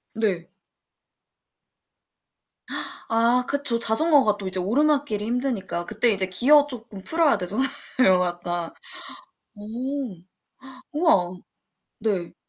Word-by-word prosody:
네. 195 -6 -1 2.6
아 235 +2 +3
그쵸. 280 -4 +4
자전거가 245 -2 +3
또 195 - -6
이제 185 0 -2
오르막길이 270 +1 +1
힘드니까 235 -8 -2
그때 220 +4 +1
이제 195 -2 -1
기어 285 +10 +4
쪼끔 225 -7 -8
풀어야 320 +2 +2
되잖아요, 210 +9 0 0.6
약간. 175 -1 -4 0.9
어우. 240 +2 -5 0.8
우와, 195 - +2 0.6
네. 190 -6 -2
225 Hz, 200 characters per minute, -24 LUFS, 190-275 Hz, 2.6 s, 그쵸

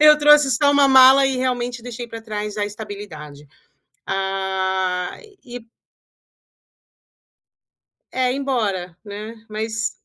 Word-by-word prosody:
eu 300 0 +7
trouxe 295 -1 +5
só 285 +4 +3
1 280 -1 +4
mala 265 +1 +7
e 265 -1 -1
realmente 245 -1 -2
deixei 240 0 -7
para 230 0 -8
trás 210 -1 -5
a 205 - 0
estabilidade. 200 -9 -9 0.6
Ah 190 -1 -2 0.3
e 240 -2 -10 2.5
é 255 -1 0
embora, 210 -11 -2
né, 210 +2 -8
mas 220 +1 -3
225 Hz, 110 wpm, -21 LUFS, 195-255 Hz, 2.5 s, eu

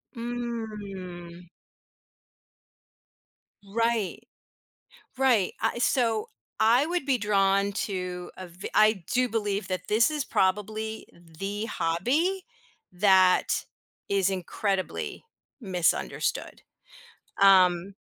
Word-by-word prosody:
Mm. 205 -7 -6 2.2
Right. 230 -1 -1 1.0
Right, 245 -8 +3
I 225 +2 0
so, 230 -4 +1 0.3
I 240 +6 +4
would 350 -2 -2
be 265 -2 +1
drawn 200 -1 +2
to 180 -3 -4
a 185 - -7
vi 175 +3 -8
I 215 -4 +4
do 250 0 +2
believe 210 -2 -2
that 185 -1 -4
this 225 +6 +3
is 300 -3 -2
probably 215 +3 -1
the 195 +6 -6
hobby 255 - 0 0.5
that 185 -1 +4 0.4
is 195 -1 +2
incredibly 190 +1 -3 0.4
misunderstood. 180 -6 -1 0.8
Um, 185 -1 +5
200 Hz, 85 wpm, -27 LUFS, 185-230 Hz, 2.2 s, Um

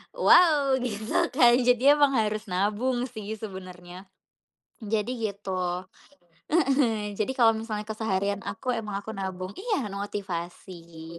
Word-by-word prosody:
wow 305 - +5
gitu 220 -3 -1
kan, 240 -2 +6
jadi 250 +4 +4
emang 285 -2 +3
harus 215 0 -1
nabung 215 +7 0
sih 220 -2 -6
sebenarnya. 185 -2 -9 0.8
Jadi, 215 +2 -1 0.2
gitu, 195 -1 -6 0.9
heeh, 265 -9 +1
jadi 215 +4 0
kalau 235 -4 +6
misalnya 220 -1 -4
keseharian 200 -2 -1
aku, 255 - -3
emang 210 -4 -4
aku 220 - -8
nabung 190 -2 -5
iya 390 - -2
motivasi, 175 -4 -7
215 Hz, 120 wpm, -26 LUFS, 195-250 Hz, 0.9 s, kan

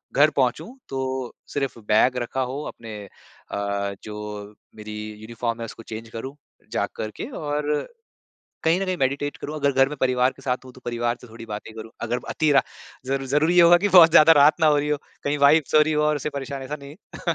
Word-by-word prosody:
घर 150 +2 +6
पहुँचूँ 135 +5 +1 0.2
तो 130 -1 -3 0.2
सिर्फ़ 135 -4 -2
बैग 125 +4 +4
रखा 125 +2 -2
हो 130 +3 -3
अपने 110 -2 -8 0.5
अ, 100 0 -2
जो 105 -1 -7 0.2
मेरी 105 0 -8 0.3
यूनिफ़ॉर्म 115 +1 -4
है 115 - -4
उसको 115 +1 -10
चेंज़ 110 +1 -8
करूँ 130 +5 -7 0.4
जा - - 0
करके 110 - -5
और, 150 - -2 0.8
कहीं 165 +4 +3
न - - 0
कहीं 185 -1 -1
मेडिटेट 140 +1 -1
करूँ 150 - -6
अगर 140 -1 +1
घर 135 0 +4
में 150 - -6
परिवार 125 0 +3
के 135 - -18
साथ 125 0 -2
हूँ 130 - -12
तो 130 - -16
परिवार 120 0 -1
से 125 - -12
थोड़ी 115 +1 -11
बातें 105 +1 -7
करूँ 110 0 -9
,अगर 120 +2 -1
अतीरा 150 -3 +3 0.4
ज़ 135 - -2
ज़रूरी 155 +6 +2
होगा 175 0 +8
की 205 +3 +1
बहुत 175 -4 +8
ज़्यादा 165 0 +8
रात 150 +2 +5
ना 160 - +5
हो 150 -1 +5
रही 145 +1 -1
हो, 150 - +1 0.3
कहीं 145 +1 0
वाइफ़ 145 +2 +5
सो 155 - +6
रही 155 +1 +3
हो 150 0 +1
और 150 0 +2
उसे 150 +1 -3
परेशान 140 -1 -5
ऐसा 145 +3 -5
नहीं 140 0 -10 0.4
है। 170 - +3
135 Hz, 210 wpm, -23 LUFS, 115-150 Hz, 0.8 s, होगा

